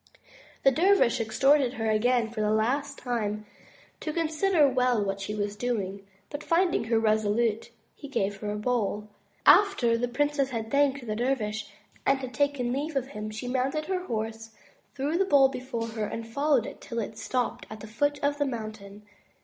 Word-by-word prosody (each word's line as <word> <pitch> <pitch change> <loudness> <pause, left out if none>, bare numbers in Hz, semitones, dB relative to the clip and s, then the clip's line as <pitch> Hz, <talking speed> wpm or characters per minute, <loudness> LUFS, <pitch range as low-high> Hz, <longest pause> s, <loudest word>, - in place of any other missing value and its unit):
The 270 - +6
dervish 350 -4 +3
exhorted 265 +4 +3
her 225 -4 -3
again 230 +1 +2
for 225 -2 -3
the 210 - +1
last 255 +7 0
time 215 -4 -3 0.5
to 310 - -3
consider 320 0 +2
well 250 -5 +2
what 195 0 -3
she 210 +2 -4
was 205 -1 -2
doing, 200 -4 -3 0.2
but 290 +1 -5
finding 345 -6 +2
her 225 0 +2
resolute 220 0 +1 0.3
he 285 - -10
gave 200 -7 -1
her 205 +1 -4
a - - -3
bowl. 210 -2 -1 0.4
After 390 - +5
the 245 - 0
princess 290 +2 0
had 225 -3 -4
thanked 280 -2 +2
the 215 -2 -3
dervish 220 -3 -1 0.3
and 265 -2 0
taken 280 -4 0
leave 295 +3 -3
of 265 -1 -1
him, 215 -5 -6
she 220 +3 -6
mounted 270 +5 -1
her 365 0 -2
horse, 225 -3 -4 0.5
threw 290 +5 -1
the - - +5
bowl 280 -6 +5
before 250 -3 -4
her, 220 -1 -3
and 225 +2 -6
followed 280 0 +1
it - - -9
till 235 - -7
it 220 -1 -3
stopped 250 +2 -2
at 215 -1 -9
the - - -7
foot 290 +7 0
of 285 +1 +1
the 290 - +2
mountain. 215 -4 -7
245 Hz, 180 wpm, -27 LUFS, 215-280 Hz, 0.5 s, The